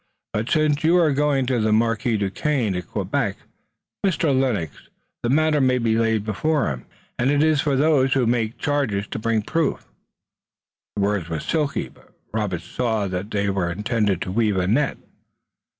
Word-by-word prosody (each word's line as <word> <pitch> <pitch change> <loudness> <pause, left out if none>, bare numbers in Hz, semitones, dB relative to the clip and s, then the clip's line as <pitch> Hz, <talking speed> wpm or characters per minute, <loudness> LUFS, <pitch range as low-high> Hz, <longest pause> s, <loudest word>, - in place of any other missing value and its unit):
But 110 +3 -2
since 155 -2 +2
you 170 +3 +4
are 165 -4 +4
going 140 -1 +1
to 125 -1 0
the 110 0 +1
Marquis 115 +1 +1
Duquesne 110 +3 0
at 90 - -4
Quebec, - - -2 0.7
Mr. 170 -6 +2
Lennox, 115 - -1 0.3
the 120 - -1
matter 155 +1 +3
may 130 -1 +3
be 115 -2 +1
laid 115 -2 +1
before 140 - 0
him, 65 -2 -7 0.3
and 125 +2 +2
it 145 +1 +3
is 155 -2 +3
for 145 -3 +1
those 135 -2 +3
who 130 -3 +2
make 115 -1 0
charges 135 -9 -1
to - - -4
bring 110 -1 0
proof." 160 +5 -1 1.1
The 100 - 0
words 100 -4 0
were 80 -1 -2
silky, 150 - -1
but - - -22 0.2
Robert 105 -6 -2
saw 110 -3 -1
that 90 +3 -4
they 100 -2 0
were 95 -3 -1
intended 105 -1 0
to 90 - -5
weave 105 -1 +1
a 90 - +1
net. 125 +9 +1
115 Hz, 175 wpm, -22 LUFS, 105-145 Hz, 1.1 s, you